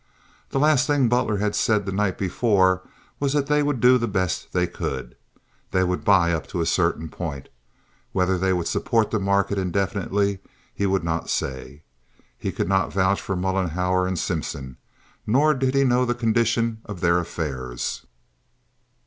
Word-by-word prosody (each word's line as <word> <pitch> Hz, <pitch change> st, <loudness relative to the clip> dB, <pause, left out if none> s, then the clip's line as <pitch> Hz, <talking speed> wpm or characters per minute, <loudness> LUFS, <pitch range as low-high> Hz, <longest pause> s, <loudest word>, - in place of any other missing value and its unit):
The -, -, -2 dB
last 150 Hz, 0 st, +3 dB
thing 145 Hz, -4 st, +3 dB
Butler 120 Hz, -3 st, +1 dB
had 105 Hz, +1 st, 0 dB
said 105 Hz, -3 st, +1 dB
the 100 Hz, -, -3 dB
night 95 Hz, 0 st, 0 dB
before 95 Hz, -1 st, +2 dB, 0.4 s
was 140 Hz, -1 st, 0 dB
that 145 Hz, -2 st, +1 dB
they 150 Hz, +1 st, +2 dB
would 145 Hz, -3 st, 0 dB
do 125 Hz, +2 st, +5 dB
the 115 Hz, -, -1 dB
best 95 Hz, -4 st, -2 dB
they -, -, +1 dB
could. 65 Hz, -3 st, -5 dB, 0.5 s
They 95 Hz, -, +1 dB
would 90 Hz, 0 st, -1 dB
buy 95 Hz, -5 st, +4 dB
up 80 Hz, -, -3 dB
to -, -, -4 dB
a -, -, 0 dB
certain 80 Hz, -, +1 dB
point. 75 Hz, -5 st, -6 dB, 0.6 s
Whether 90 Hz, 0 st, +1 dB
they 95 Hz, +1 st, +1 dB
would 90 Hz, -2 st, 0 dB
support 115 Hz, -2 st, +1 dB
the 110 Hz, -, +1 dB
market 100 Hz, 0 st, +1 dB
indefinitely 100 Hz, +1 st, -1 dB, 0.3 s
he 100 Hz, -, -1 dB
would 95 Hz, -2 st, +1 dB
not 80 Hz, 0 st, -2 dB
say. 65 Hz, +3 st, -4 dB, 0.5 s
He -, -, -4 dB
could -, -, -2 dB
not 95 Hz, -1 st, +1 dB
vouch 95 Hz, +1 st, +1 dB
for 95 Hz, -, -3 dB
Mollenhauer 90 Hz, 0 st, 0 dB
and 95 Hz, -1 st, -2 dB
Simpson. 65 Hz, -4 st, -4 dB, 0.5 s
Nor 145 Hz, +8 st, +4 dB
did 135 Hz, -1 st, 0 dB
he 135 Hz, -, +4 dB
know 125 Hz, -1 st, +3 dB
the 120 Hz, -1 st, 0 dB
condition 115 Hz, -1 st, +1 dB
of 100 Hz, -5 st, -8 dB
their 85 Hz, 0 st, +3 dB
affairs. 65 Hz, -8 st, -4 dB
95 Hz, 170 wpm, -23 LUFS, 90-115 Hz, 0.6 s, do